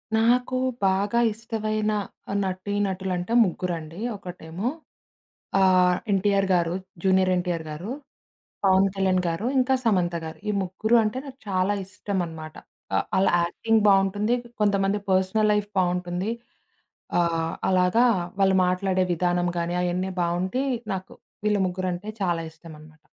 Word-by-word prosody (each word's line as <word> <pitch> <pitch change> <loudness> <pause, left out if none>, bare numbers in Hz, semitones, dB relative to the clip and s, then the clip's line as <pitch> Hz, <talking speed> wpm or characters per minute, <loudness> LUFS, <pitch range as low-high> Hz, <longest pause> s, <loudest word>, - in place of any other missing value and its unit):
నాకు 245 +3 +2 0.3
బాగా 200 +4 +2
ఇష్టమైన 215 -1 -2 0.5
నటీ 190 +1 -3
నటులంటే 185 +1 -3
ముగ్గురండి. 170 -3 -4 0.2
ఒకటేమో, 180 +1 -6 0.9
ఆహ్, 185 -1 +4
ఎన్‌టీఆర్ 195 0 +2
గారు 170 -1 +2 0.3
'జూనియర్ 190 -1 +3
ఎన్‌టీఆర్' 175 -2 -2
గారు, 175 +9 -6 0.7
'పవన్ 190 0 +5
కళ్యాణ్' 190 -1 +2
గారు, 170 +7 -2
ఇంకా 260 +1 +3
'సమంత' 180 -6 +1
గారు. 160 - -7
ఈ - - +3
ముగ్గురు 205 +5 +1
అంటే 215 +3 -2
నాకు 270 -1 -10
చాలా 190 +1 +1
ఇష్టం 195 +1 -4
అనమాట. 160 -1 -9 0.4
ఆ! - - +4 0.2
ఆళ్ళ 190 +1 +3 0.2
యాక్టింగ్ 220 +6 +1
బావుంటుంది. 200 +4 +3 0.3
కొంతమంది 200 -1 +2
పర్సనల్ 190 +3 +2
లైఫ్ 210 0 -1
బావుంటుంది. 180 +2 -1 0.9
ఆహ్, 165 -1 0 0.2
అలాగా 185 +6 +4 0.4
వాళ్ళు 190 -1 +4
మాట్లాడే 185 +1 +1
విధానం 175 +1 +1
గానీ 170 +1 -1
అయన్నీ 180 +2 -1
బావుండి 185 +9 -1 0.3
నాకు 190 0 -7 0.3
వీళ్ళు 210 -1 +2
ముగ్గురంటే 185 +2 -4
చాలా 175 -3 +1
ఇష్టం 160 0 -13
అనమాట. 155 0 -17
185 Hz, 125 wpm, -25 LUFS, 175-205 Hz, 0.9 s, పవన్